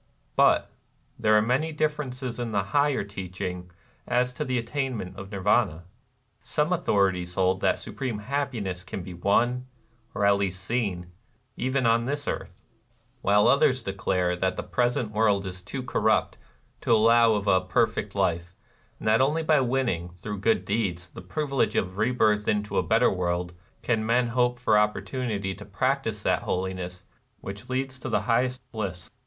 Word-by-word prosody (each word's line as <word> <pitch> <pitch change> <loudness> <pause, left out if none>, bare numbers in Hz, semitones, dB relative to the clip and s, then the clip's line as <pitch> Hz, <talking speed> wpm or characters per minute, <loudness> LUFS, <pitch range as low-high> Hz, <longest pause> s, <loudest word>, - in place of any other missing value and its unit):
But - - +4 0.5
there 110 -2 +4
are 105 - +4
many 130 +8 +1
differences 135 -5 -2
in 120 -2 -3
the 100 -1 +1
higher 145 -3 +3
teaching 90 -2 -6 0.4
as 125 0 +1
to - - -3
the 130 -1 -1
attainment 120 -5 -3
of 100 +1 -9
Nirvana. 100 -3 +1 0.6
Some 150 +4 0
authorities 95 - +1
hold 95 0 +2
that - - +4
the - - -10
supreme 125 -5 -4
hap 140 +7 -2
piness 95 -7 -4
can 90 +2 -6
be 90 - -8
won, 120 +8 +1 0.5
or 100 - +1
at 100 0 +5
least 95 -1 -2
seen, 95 -6 -2 0.4
even 130 +1 0
on 115 +1 +3
this 145 +2 -3
earth; 90 - -5 0.6
while 105 +1 +4
others 140 -3 +4
declare 95 -3 0
that 95 +1 -1
the - - -3
present 120 -2 0
world 105 -2 +2
is 95 0 -6
too 130 +8 -6
corrupt 125 - +1 0.4
to - - -1
allow 115 +1 +5
of 105 -1 -1
a 95 -2 +4
per 95 +6 +3
fect 105 -2 -6
life, 90 -2 0 0.4
and - - -6
that 110 +2 +4
only 150 +5 +2
by 155 -2 +4
winning, 120 -10 0
through 95 +4 -7
good 110 +3 +1
deeds, 95 -5 -1
the 85 - -10
privilege 135 +9 -1
of 95 +1 -1
rebirth 110 -3 +2
into 105 0 +1
a - - +3
better - - +3
world, 90 -1 -2 0.3
can 115 -3 +1
men 120 +2 +2
hope 125 0 +1
for 110 -3 +3
opportunity 105 -2 -1
to 100 - -10
practice 115 +1 -1
that - - +2
holiness 90 -1 -3 0.4
which 100 +3 -8
leads 130 0 -2
to - - -5
the - - +1
highest 125 +2 0
bliss. 95 -7 -5
105 Hz, 170 wpm, -26 LUFS, 95-125 Hz, 0.6 s, at